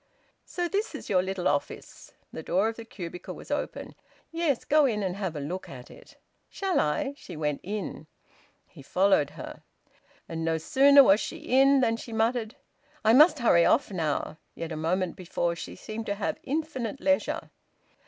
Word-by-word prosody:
So 350 -1 -3
this 405 +5 -2
is - - -7
your 185 -2 +4
little 190 -2 -2
office!" 145 0 -3 0.2
The - - -6
door 185 +6 +1
of 225 - -6
the 230 - -9
cubicle 180 -6 -8
was - - -11
open. - - -4 0.4
"Yes, 330 -6 0
go 300 -1 +4
in 210 -4 -1
and 185 -1 -2
have 190 -5 -4
a - - -3
look 170 +7 -5
at 125 -2 -11
it." - - -16 0.3
"Shall 385 -3 -1
I?" 270 - 0
She 225 - -10
went 150 -2 -1
in. 195 -5 -5 0.6
He - - -15
followed 185 0 +2
her. - - -8 0.7
And 165 0 -4
no 160 0 +1
sooner 275 - +6
was 200 -3 +5
she 325 - -5
in 275 -2 +4
than 230 -2 +2
she 230 - -9
muttered, 225 +1 0 0.5
"I 220 - +6
must 305 +5 +7
hurry 200 -10 +4
off 240 +3 +3
now." 160 -3 -2 0.2
Yet 165 0 -6
a - - -3
moment 170 +3 -1
before 175 -1 -2
she - - -8
seemed 220 +3 -7
to 205 - -1
have 200 - -3
infinite 275 -5 -3
leisure. 285 -1 0
205 Hz, 180 wpm, -27 LUFS, 170-270 Hz, 0.7 s, must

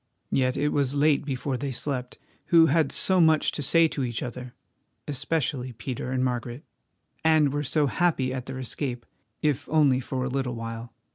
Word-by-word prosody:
Yet 130 -1 +1
it 150 +1 +1
was 140 -2 0
late 145 0 +3
before 135 -1 -2
they 140 +2 -3
slept, 125 -1 -3 0.3
who 165 -1 +6
had 155 -1 +2
so 185 -1 +4
much 160 -2 +4
to - - -4
say 165 +4 +4
to 140 - -3
each 120 -2 -3
other—especially 130 +2 -5
Peter 125 +2 -5
and 130 0 0
Margaret—and 135 +4 -2
were 145 0 -1
so 150 +2 +1
happy 140 -3 0
at 130 -1 -5
their 130 0 -6
escape, 125 -1 -4 0.4
if 150 -3 0
only 145 -5 +4
for 130 0 -3
a - - -1
little 130 -2 -2
while. 115 +1 -6
135 Hz, 165 wpm, -26 LUFS, 125-150 Hz, 0.4 s, who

